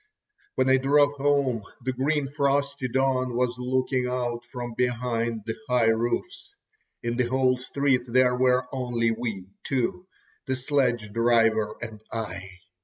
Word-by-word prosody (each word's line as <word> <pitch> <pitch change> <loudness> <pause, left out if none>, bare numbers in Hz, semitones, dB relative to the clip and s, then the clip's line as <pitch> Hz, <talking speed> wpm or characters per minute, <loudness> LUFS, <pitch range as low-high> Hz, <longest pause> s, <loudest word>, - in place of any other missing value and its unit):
When 130 - +2
I 130 0 +5
drove 145 +2 +4
home, 140 -4 +1 0.2
the 130 +1 -1
green 140 +2 0
frosty 140 -1 0
dawn 130 -1 0
was 125 0 +1
looking 130 0 0
out 120 -1 -2
from 120 -1 -6
behind 115 -2 -1
the 110 - -3
high 125 -2 +4
roofs. 355 - -2 0.5
In 120 0 -2
the 125 -2 +2
whole 130 0 +2
street 135 0 +1
there 125 +1 +3
were 125 0 +3
only 120 -3 0
we 110 -5 -4 0.2
two, 135 +8 -1 0.4
the 130 - 0
sledge 125 -5 0
driver 115 -2 +3
and 110 -2 -8
I. 100 -4 -5
125 Hz, 140 wpm, -26 LUFS, 115-135 Hz, 0.5 s, I